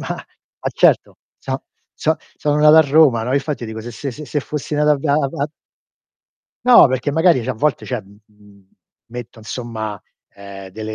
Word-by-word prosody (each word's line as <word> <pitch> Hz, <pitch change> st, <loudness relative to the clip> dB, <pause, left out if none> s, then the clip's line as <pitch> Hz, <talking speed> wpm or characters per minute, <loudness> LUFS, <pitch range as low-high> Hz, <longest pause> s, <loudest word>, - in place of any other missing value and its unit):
ma -, -, -4 dB
ma -, -, -9 dB
certo -, -, +2 dB, 0.2 s
so' -, -, -4 dB, 0.3 s
so' 160 Hz, +1 st, 0 dB, 0.2 s
sono 150 Hz, 0 st, 0 dB
nato 150 Hz, +1 st, +7 dB
a -, -, +10 dB
Roma, 145 Hz, -5 st, +4 dB
no, 125 Hz, +4 st, -1 dB
infatti 140 Hz, -3 st, -2 dB
dico 110 Hz, 0 st, -7 dB
se 120 Hz, -, -7 dB
se 135 Hz, +4 st, -5 dB
se 145 Hz, +2 st, -4 dB
fossi 150 Hz, +2 st, -6 dB
nato 150 Hz, 0 st, +3 dB
a -, -, +2 dB
ve 140 Hz, +1 st, -2 dB
a 140 Hz, -, +4 dB
va 140 Hz, +2 st, -3 dB, 1.2 s
No, 245 Hz, -, +8 dB
perché 130 Hz, +3 st, -1 dB
magari 160 Hz, -4 st, +3 dB
cioè 130 Hz, -, -2 dB
a -, -, -3 dB
volte 140 Hz, +3 st, 0 dB
cioè, 125 Hz, -4 st, -3 dB
mhmm, 100 Hz, +1 st, -20 dB
m 105 Hz, -2 st, -22 dB, 0.4 s
metto 120 Hz, -1 st, -8 dB
insomma, 110 Hz, -2 st, -6 dB, 0.3 s
ehm, 100 Hz, -1 st, -10 dB
delle 110 Hz, +2 st, -6 dB
130 Hz, 185 wpm, -19 LUFS, 110-150 Hz, 1.2 s, a